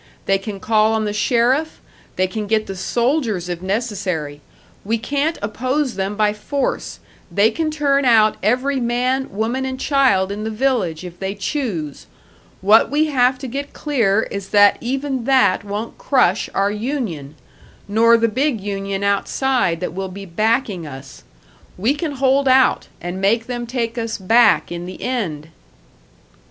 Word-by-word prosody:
They 195 0 +2
can 195 0 -6
call 215 +2 +2
on 220 -1 0
the 205 - -2
sheriff, 250 +7 +1 0.4
they 185 - +2
can 210 +3 -4
get 215 0 +1
the 195 - -6
soldiers, 235 - 0
if 175 -1 -4
necessary! 185 -8 -3 0.4
We 225 +3 0
can't 285 +7 -1
oppose 255 +5 -1
them 195 +1 -3
by 210 0 +2
force 270 +6 -3 0.3
they 205 +5 +3
can 315 +5 -1
turn 285 -2 +1
out 220 -4 +4
every 255 +6 +1
man, 250 +2 0
woman 225 +6 -2
and 260 0 -4
child 260 -10 +2
in 205 +1 -4
the 220 - -2
village, 215 -9 -1
if 175 -1 -9
they 195 +1 -3
choose. 195 - -4 0.5
What 210 +4 +5
we 300 +2 +2
have 255 0 +3
to 265 - -7
get 280 +3 -5
clear 225 -8 +1
is 200 -1 -5
that 205 -1 +5
even 265 0 -2
that 245 -9 +3
won't 205 +3 -5
crush 220 -9 +2
our 200 +1 +2
union! 210 - -4 0.5
Nor 230 +3 +5
the 230 0 +2
big 260 +2 0
union 195 0 -4
outside, 200 -1 0
that 180 - -3
will 190 +1 -4
be 195 +2 -8
backing 210 - 0
us! 135 -1 -11 0.5
We 220 +9 +2
can 305 0 -3
hold 270 +1 +2
out, 260 0 +4
and 175 +2 -5
make 225 +4 +2
them 240 -1 -5
take 235 -1 -2
us 225 -1 -3
back 215 +2 +3
in 175 0 -5
the 185 - -8
end!" 175 -12 -3
220 Hz, 160 wpm, -19 LUFS, 195-260 Hz, 0.5 s, What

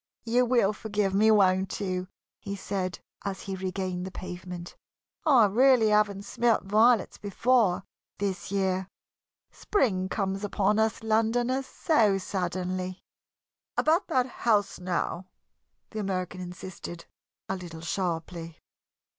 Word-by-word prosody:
"You 245 +2 +3
will 235 -5 +3
forgive 210 -2 -1
me, 215 +3 +4
won't 190 -3 +3
you?" 185 -2 -2 0.3
he 200 0 -5
said, 190 -1 -3 0.3
as 195 -1 -4
he 195 - -4
regained 185 -1 -3
the 190 - -4
pavement. 180 -1 -7 0.5
"I 260 -7 +7
really 235 +2 +5
haven't 210 -2 +2
smelt 235 +1 +1
violets 215 +2 +3
before 205 -2 +2 0.3
this 195 -2 -3
year. 190 -1 0 0.6
Spring 190 - 0
comes 195 0 -2
upon 205 +1 +1
us 220 0 +1
Londoners 240 +4 +1
so 220 - +2
suddenly." 185 0 -3 0.7
"About 330 +5 +3
that 260 -7 +2
house, 220 -5 0
now," 180 0 -2 0.6
the 220 - -4
American 185 -2 -3
insisted, 180 -1 -8 0.4
a 190 - -1
little 170 -3 -8
sharply. 165 -1 -3
195 Hz, 120 wpm, -28 LUFS, 185-220 Hz, 0.7 s, I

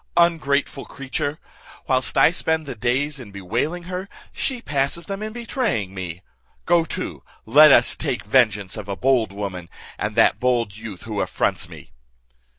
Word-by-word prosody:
Ungrateful 150 -5 +2
creature! 140 +2 -4 0.5
whilst 130 -3 0
I 160 - +6
spend 160 -2 -1
the 140 - -5
days 130 +6 -1
in 120 -5 -9
bewailing 115 - -3
her, 185 +2 -5 0.2
she 260 -2 -1
passes 145 -2 0
them 195 +2 -5
in 215 0 -4
betraying 225 - -2
me. 90 -1 -6 0.4
Go 170 -1 +4
to, - - -5 0.2
let 150 +6 +8
us - - +5
take - - -3
vengeance 105 -5 +2
of 105 -2 -7
a 100 - -2
bold 125 -2 +2
woman, 95 -4 -5 0.3
and - - -2
that - - +4
bold 120 -5 +1
youth 110 -4 -9
who 110 -3 -3
affronts - - -1
me." - - -13
130 Hz, 155 wpm, -22 LUFS, 105-160 Hz, 0.5 s, let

